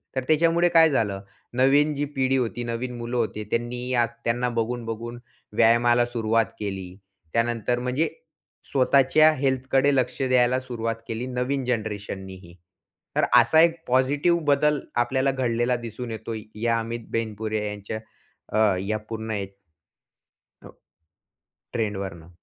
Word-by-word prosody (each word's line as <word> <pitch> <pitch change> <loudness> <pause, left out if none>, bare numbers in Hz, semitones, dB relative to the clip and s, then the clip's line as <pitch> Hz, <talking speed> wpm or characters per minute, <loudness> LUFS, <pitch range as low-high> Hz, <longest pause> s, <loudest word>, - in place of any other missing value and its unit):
तर 130 - -1
त्याच्यामुळे 165 +2 +3
काय 165 -1 +6
झालं? 105 -8 0 0.3
नवीन 140 +4 +4
जी 145 0 -1
पिढी 135 0 +2
होती. 120 -1 -2
नवीन 120 +1 -4
मुलं 120 +1 -3
होती 110 -2 -1
त्यांनी 120 +2 -2
आज - - -8 0.2
त्यांना 120 +1 +1
बघून-बघून 115 0 -4 0.4
व्यायामाला 120 +1 +4
सुरुवात 115 -1 +1
केली. 95 -3 -5 0.4
त्यानंतर 120 +1 0
म्हणजे 130 +6 0 0.6
स्वतःच्या 140 +3 +5
हेल्थकडे 135 +1 +2
लक्ष 130 +1 0
द्यायला 130 -1 +3
सुरुवात 115 -3 -3
केली 115 +2 -3
नवीन 130 +2 -1
जनरेशननीही. 100 -6 -4 0.6
तर - - +3
असा 120 +7 +5
एक 165 0 +4
पॉझिटिव्ह 140 +7 +2
बदल 150 +1 +3 0.2
आपल्याला 130 +2 +1
घडलेला 125 -1 0
दिसून 120 0 -7
येतो 110 +1 -5 0.3
या 115 0 +2
अमित 115 +1 -4
बेनपुरिया 110 -1 -2
यांच्या 105 +1 -5 0.6
अ, 110 -3 +4
या 105 +3 -1
पूर्ण 110 0 -4
या 100 -1 -2 1.2
हो, - - -12 1.0
ट्रेंडवरून. 95 -7 -3
120 Hz, 125 wpm, -25 LUFS, 110-130 Hz, 1.2 s, काय